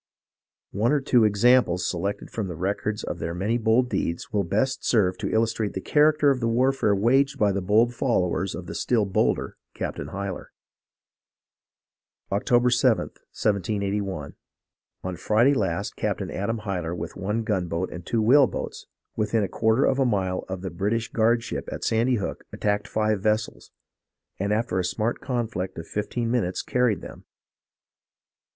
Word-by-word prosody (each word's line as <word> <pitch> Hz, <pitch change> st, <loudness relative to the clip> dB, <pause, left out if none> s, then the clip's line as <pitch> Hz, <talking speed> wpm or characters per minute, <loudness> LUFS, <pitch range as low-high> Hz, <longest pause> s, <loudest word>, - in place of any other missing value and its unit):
One 110 Hz, +6 st, +1 dB
or 150 Hz, -, +3 dB
two 125 Hz, -4 st, +3 dB
examples 105 Hz, -4 st, +3 dB
selected 100 Hz, +3 st, -3 dB
from 110 Hz, -4 st, -3 dB
the 90 Hz, -, -5 dB
records 100 Hz, +4 st, -2 dB
of 85 Hz, -, -4 dB
their 85 Hz, +1 st, -3 dB
many 105 Hz, +7 st, 0 dB
bold 115 Hz, +3 st, +3 dB
deeds, 85 Hz, -7 st, -3 dB
will 100 Hz, -1 st, +2 dB
best 110 Hz, +9 st, 0 dB
serve 95 Hz, -6 st, +2 dB
to -, -, -2 dB
illustrate 110 Hz, -1 st, 0 dB
the -, -, -3 dB
character 150 Hz, +4 st, +4 dB
of 135 Hz, -, 0 dB
the 115 Hz, -, 0 dB
warfare 125 Hz, -2 st, +2 dB
waged 135 Hz, +7 st, +2 dB
by 105 Hz, -4 st, +3 dB
the 100 Hz, 0 st, -1 dB
bold 110 Hz, +6 st, +3 dB
followers 95 Hz, -7 st, 0 dB
of 90 Hz, -, -7 dB
the -, -, -7 dB
still 115 Hz, -4 st, +1 dB
bolder 95 Hz, -, 0 dB, 0.2 s
Captain -, -, -4 dB
Hyler. 100 Hz, -1 st, -5 dB, 1.8 s
"Oct. 100 Hz, +1 st, -1 dB, 0.2 s
7, 120 Hz, -2 st, +4 dB
1781. 100 Hz, -5 st, -2 dB, 0.7 s
On 95 Hz, -1 st, -3 dB
Friday 110 Hz, -, +3 dB
last 95 Hz, -10 st, -1 dB
Capt. -, -, -2 dB
Adam 110 Hz, +4 st, -3 dB
Hyler 90 Hz, -5 st, -3 dB
with -, -, -6 dB
one 105 Hz, +5 st, -2 dB
gunboat 90 Hz, -4 st, -1 dB
and 90 Hz, -, -7 dB
two 110 Hz, +5 st, 0 dB
whale 135 Hz, +4 st, +6 dB
boats, -, -, -6 dB, 0.3 s
within 110 Hz, 0 st, +1 dB
a -, -, 0 dB
quarter 110 Hz, +6 st, +2 dB
of 135 Hz, -, +1 dB
a -, -, +4 dB
mile 95 Hz, -6 st, 0 dB
of 95 Hz, -1 st, -4 dB
the 95 Hz, -, -4 dB
[British] 105 Hz, +6 st, -1 dB
guardship 115 Hz, 0 st, 0 dB
at -, -, -6 dB
Sandy 115 Hz, +3 st, +2 dB
Hook 105 Hz, -, -4 dB
attacked 105 Hz, 0 st, -1 dB
five 110 Hz, -2 st, 0 dB
vessels, 110 Hz, +1 st, -1 dB, 0.7 s
and 100 Hz, +2 st, -1 dB
after 105 Hz, -3 st, 0 dB
a -, -, 0 dB
smart 110 Hz, +6 st, -1 dB
conflict 115 Hz, -7 st, -3 dB
of 85 Hz, -, -6 dB
fifteen 115 Hz, +3 st, -2 dB
minutes 100 Hz, -7 st, 0 dB
carried 125 Hz, -5 st, +1 dB
them. -, -, -11 dB
105 Hz, 160 wpm, -25 LUFS, 95-120 Hz, 1.8 s, whale